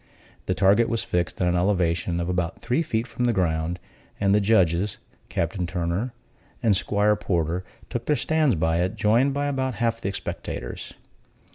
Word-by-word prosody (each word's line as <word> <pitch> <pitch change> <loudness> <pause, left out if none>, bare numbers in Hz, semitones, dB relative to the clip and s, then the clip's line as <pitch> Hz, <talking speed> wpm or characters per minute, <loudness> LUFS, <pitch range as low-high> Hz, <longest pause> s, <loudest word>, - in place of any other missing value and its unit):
The - - +1
target 100 +5 +4
was 115 -1 0
fixed 85 -2 -1
at - - +2
an 90 - +2
elevation 90 -2 +1
of 85 - -2
about 90 -1 -2
three 130 +7 +1
feet 115 -8 -1
from 125 0 -2
the 120 - +2
ground; 85 -2 0 0.4
and 100 -1 +3
the 105 - +4
judges 95 -2 +2 0.3
(Captain 85 +1 -1
Turner 90 +6 -2 0.5
and 110 -4 +4
'Squire 105 +2 +2
Porter) 90 -3 -1 0.2
took 120 -1 -4
their 150 - +3
stands 155 -6 +2
by 80 +1 +1
it, 90 +1 -1
joined 120 +6 +3
by 145 0 0
about 130 -2 -1
half 115 -1 0
the 100 - -1
spectators. - - -5
100 Hz, 170 wpm, -25 LUFS, 85-115 Hz, 0.5 s, target